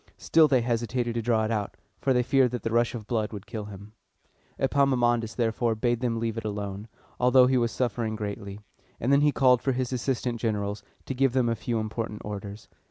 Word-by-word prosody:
Still 160 Hz, -1 st, +4 dB
they 130 Hz, -4 st, +3 dB
hesitated 120 Hz, 0 st, -1 dB
to 115 Hz, -, -1 dB
draw 110 Hz, -1 st, +1 dB
it 110 Hz, -, -2 dB
out, 105 Hz, -3 st, -2 dB, 0.2 s
for 135 Hz, -, +1 dB
they 125 Hz, -1 st, +3 dB
feared 130 Hz, 0 st, +3 dB
that 125 Hz, 0 st, -5 dB
the 115 Hz, -, -2 dB
rush 120 Hz, +1 st, +2 dB
of 110 Hz, -3 st, -6 dB
blood 110 Hz, -1 st, -1 dB
would 105 Hz, -1 st, -8 dB
kill 110 Hz, -2 st, -6 dB
him. 100 Hz, +1 st, -11 dB, 0.6 s
Epaminondas, 125 Hz, -4 st, +2 dB
therefore, 115 Hz, -1 st, 0 dB
bade 120 Hz, +1 st, 0 dB
them 120 Hz, -2 st, -1 dB
leave 115 Hz, 0 st, -2 dB
it -, -, -9 dB
alone, 105 Hz, 0 st, -5 dB, 0.3 s
although 125 Hz, +1 st, +6 dB
he 130 Hz, +1 st, +2 dB
was 120 Hz, -2 st, +2 dB
suffering 115 Hz, -3 st, -1 dB
greatly; 100 Hz, -1 st, -5 dB, 0.4 s
and 125 Hz, -, 0 dB
then 140 Hz, -, +5 dB
he 150 Hz, 0 st, +4 dB
called 125 Hz, -3 st, +4 dB
for 135 Hz, -, 0 dB
his 130 Hz, 0 st, -2 dB
assistant 125 Hz, -1 st, -2 dB
generals, 105 Hz, -2 st, -2 dB, 0.2 s
to -, -, -3 dB
give 135 Hz, -1 st, +2 dB
them 130 Hz, -2 st, +2 dB
a 115 Hz, -, +1 dB
few 115 Hz, 0 st, -2 dB
important 110 Hz, -1 st, -4 dB
orders. 105 Hz, 0 st, -7 dB
115 Hz, 210 wpm, -27 LUFS, 110-125 Hz, 0.6 s, although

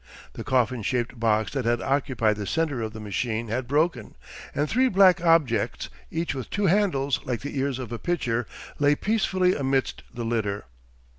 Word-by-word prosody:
The -, -, -6 dB
coffin 125 Hz, -2 st, +1 dB
shaped 120 Hz, +2 st, -2 dB
box 110 Hz, -1 st, +1 dB
that 135 Hz, -3 st, -2 dB
had 120 Hz, 0 st, +2 dB
occupied 130 Hz, -6 st, +1 dB
the 105 Hz, -2 st, -4 dB
centre 150 Hz, -, 0 dB
of 110 Hz, -1 st, -3 dB
the 110 Hz, -, -8 dB
machine 110 Hz, +2 st, -2 dB
had 120 Hz, +3 st, -2 dB
broken, 145 Hz, -4 st, 0 dB, 0.4 s
and 145 Hz, +2 st, +1 dB
three 255 Hz, -, +3 dB
black 185 Hz, -4 st, +5 dB
objects, 165 Hz, -8 st, +2 dB, 0.2 s
each 165 Hz, +1 st, -2 dB
with 130 Hz, -4 st, -6 dB
two 200 Hz, 0 st, -1 dB
handles 170 Hz, -8 st, +2 dB
like 125 Hz, -3 st, -3 dB
the 145 Hz, +1 st, -6 dB
ears 135 Hz, -1 st, -1 dB
of 125 Hz, -4 st, -6 dB
a 115 Hz, -, -4 dB
pitcher, 125 Hz, -9 st, -1 dB, 0.3 s
lay 145 Hz, 0 st, +4 dB
peacefully 185 Hz, -2 st, +1 dB
amidst 135 Hz, -1 st, -1 dB
the 120 Hz, -1 st, -5 dB
litter. 105 Hz, -3 st, -1 dB
130 Hz, 175 wpm, -25 LUFS, 115-165 Hz, 0.4 s, black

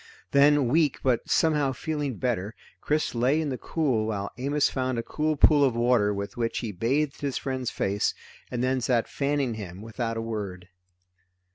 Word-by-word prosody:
Then 140 Hz, -1 st, +5 dB
weak, 150 Hz, +2 st, +2 dB
but 125 Hz, -3 st, +1 dB
somehow 150 Hz, -4 st, +2 dB
feeling 145 Hz, -2 st, -3 dB
better, 115 Hz, -4 st, -2 dB, 0.3 s
Chris 150 Hz, +1 st, 0 dB
lay 125 Hz, +6 st, +2 dB
in 155 Hz, -2 st, -1 dB
the 130 Hz, -, -3 dB
cool 130 Hz, -10 st, 0 dB
while 100 Hz, -2 st, -3 dB
Amos 140 Hz, +3 st, +1 dB
found 130 Hz, -2 st, -2 dB
a 115 Hz, -, -1 dB
cold 155 Hz, +2 st, -1 dB
pool 145 Hz, -2 st, +6 dB
of 130 Hz, -4 st, +2 dB
water 120 Hz, -3 st, +3 dB
with 100 Hz, 0 st, -4 dB
which 115 Hz, -1 st, -1 dB
he 115 Hz, -4 st, -3 dB
bathed 135 Hz, +10 st, -1 dB
his 140 Hz, -2 st, -1 dB
friend's 130 Hz, -2 st, -3 dB
face, 100 Hz, +1 st, -1 dB, 0.3 s
and 125 Hz, -1 st, -2 dB
then 130 Hz, 0 st, +1 dB
sat 120 Hz, -1 st, +1 dB
fanning 140 Hz, -3 st, -1 dB
him 95 Hz, -4 st, -7 dB
without 115 Hz, 0 st, -3 dB
a -, -, -2 dB
word. 100 Hz, -5 st, -5 dB
125 Hz, 175 wpm, -26 LUFS, 115-145 Hz, 0.3 s, pool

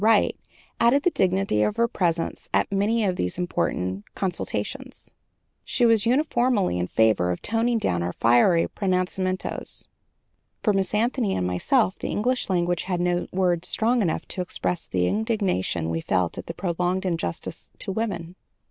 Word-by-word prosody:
Wright, 220 Hz, -1 st, +4 dB, 0.4 s
added 250 Hz, +5 st, +4 dB
the 360 Hz, -, +3 dB
dignity 185 Hz, -, +1 dB
of 210 Hz, -, +1 dB
her 235 Hz, +1 st, +2 dB
presence 170 Hz, -6 st, -1 dB
at -, -, +1 dB
many 210 Hz, +3 st, +1 dB
of 185 Hz, -3 st, 0 dB
these 90 Hz, -, -2 dB
important 95 Hz, -, -1 dB
consultations. 185 Hz, -3 st, -4 dB, 0.5 s
She 245 Hz, -, +1 dB
was 225 Hz, -2 st, +4 dB
uniformly 245 Hz, -, +2 dB
in 90 Hz, -, -1 dB
favor 110 Hz, -5 st, +2 dB
of 90 Hz, -, -3 dB
toning 230 Hz, +1 st, +1 dB
down 90 Hz, -, 0 dB
our 85 Hz, +1 st, -2 dB
fiery 120 Hz, +9 st, +4 dB
pronunciamentos. 185 Hz, -1 st, -2 dB, 0.8 s
For 210 Hz, -, +3 dB
Miss 195 Hz, +1 st, 0 dB
Anthony 230 Hz, -1 st, +1 dB
and 90 Hz, -, -1 dB
myself, 190 Hz, -, +1 dB
the -, -, -3 dB
English 245 Hz, +2 st, 0 dB
language 175 Hz, -2 st, 0 dB
had 180 Hz, -2 st, -1 dB
no 175 Hz, 0 st, 0 dB
words 180 Hz, -2 st, +1 dB
strong 235 Hz, +2 st, +2 dB
enough 170 Hz, -6 st, -1 dB
to 185 Hz, -, -2 dB
express 180 Hz, -1 st, -2 dB
the 90 Hz, -1 st, 0 dB
indignation 190 Hz, -, 0 dB
we 80 Hz, 0 st, -2 dB
felt 90 Hz, 0 st, 0 dB
at -, -, -9 dB
the 165 Hz, -, -5 dB
prolonged 180 Hz, +1 st, -1 dB
injustice 165 Hz, -, -4 dB
to -, -, -5 dB
women. 190 Hz, -5 st, -3 dB
185 Hz, 155 wpm, -25 LUFS, 165-220 Hz, 0.8 s, Wright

